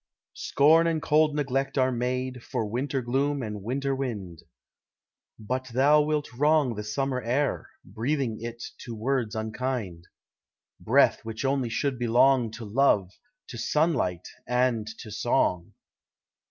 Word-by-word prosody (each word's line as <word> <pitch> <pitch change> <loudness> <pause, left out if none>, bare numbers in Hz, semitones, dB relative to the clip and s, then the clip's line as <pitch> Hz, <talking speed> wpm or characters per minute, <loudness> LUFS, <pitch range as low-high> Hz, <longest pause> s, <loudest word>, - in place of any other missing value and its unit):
Scorn 160 +4 +4
and 165 -1 +1
cold 150 0 +2
neglect 135 -1 -1
are 130 0 +3
made 125 +1 -2
For 125 -5 -2
winter 130 +5 -2
gloom 135 +3 0
and 105 -2 -5
winter 135 +5 -1
wind, 100 - -5 1.0
But 130 +4 -3
thou 140 +5 +4
wilt 150 -2 -1
wrong 145 -1 +3
the 105 -1 -5
summer 130 +4 -2
air, 130 +5 -1 0.2
Breathing 115 +3 -2
it 120 0 -6 0.2
to 120 -2 -7
words 120 -1 -1
unkind, 110 -5 -3 0.7
Breath - - +3
which 110 +3 -5
only 135 -3 0
should 130 +2 -1
belong 120 +1 +3
To 115 0 -7
love, 105 -4 +2 0.4
to 120 - -7
sunlight, 135 - 0 0.2
and 125 -3 +1
to 110 - -10
song! 95 -6 0
125 Hz, 130 wpm, -27 LUFS, 110-140 Hz, 1.0 s, Scorn